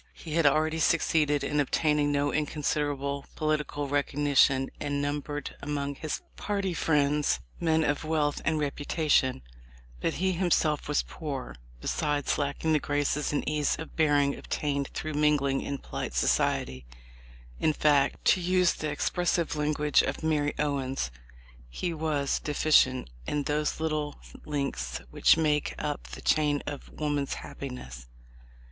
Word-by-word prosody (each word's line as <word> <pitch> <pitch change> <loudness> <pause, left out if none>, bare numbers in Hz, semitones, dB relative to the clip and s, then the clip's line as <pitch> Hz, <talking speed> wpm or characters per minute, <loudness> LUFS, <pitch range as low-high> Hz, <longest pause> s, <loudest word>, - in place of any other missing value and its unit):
He 160 - -8
had 165 -2 +4
already 155 +3 +2
succeeded 150 -3 +2
in 150 - 0
obtaining 150 +1 +2
no 145 0 +1
inconsiderable 145 -2 -1
political 150 -2 -1
recognition, 140 -1 +2
and 145 -1 -2
numbered 145 +1 -3
among 145 -1 -2
his 155 +2 -4 0.2
party 200 -3 -1
friends 150 - +2 0.2
men 160 -1 +2
of 145 0 0
wealth 155 -2 0
and 160 0 +1
reputation; 145 - +1 0.6
but - - -1
he 190 +2 +1
himself 170 -4 +1
was 150 -1 +1
poor, 140 -5 -6 0.3
besides 145 -2 0
lacking 145 +3 0
the 155 - +4
graces 145 0 0
and 145 - -1
ease 150 -1 +1
of 160 - -9
bearing 145 -3 +3
obtained 140 -2 -2
through 155 - -3
mingling 145 -2 +2
in 140 - -3
polite - - -5
society 65 -1 +1 0.4
— - - -22 0.3
in 155 - +3
fact, 145 -2 +2
to 185 - +4
use 180 0 +3
the 155 - -4
expressive 170 +2 0
language 150 -1 +2
of - - -3
Mary 150 -2 +1
Owens, 135 - -1 0.6
he 170 - -3
was 150 -3 0
"deficient 135 - +3 0.2
in 145 -1 0
those 150 +2 -1
little 155 -2 -2 0.3
links 135 - -2
which - - +5
make 150 -2 +1
up 145 -1 -3
the - - -9
chain 150 -2 +2
of 145 -1 -6
woman's 145 -2 -2
happiness." 65 - -8
150 Hz, 140 wpm, -28 LUFS, 140-155 Hz, 0.6 s, which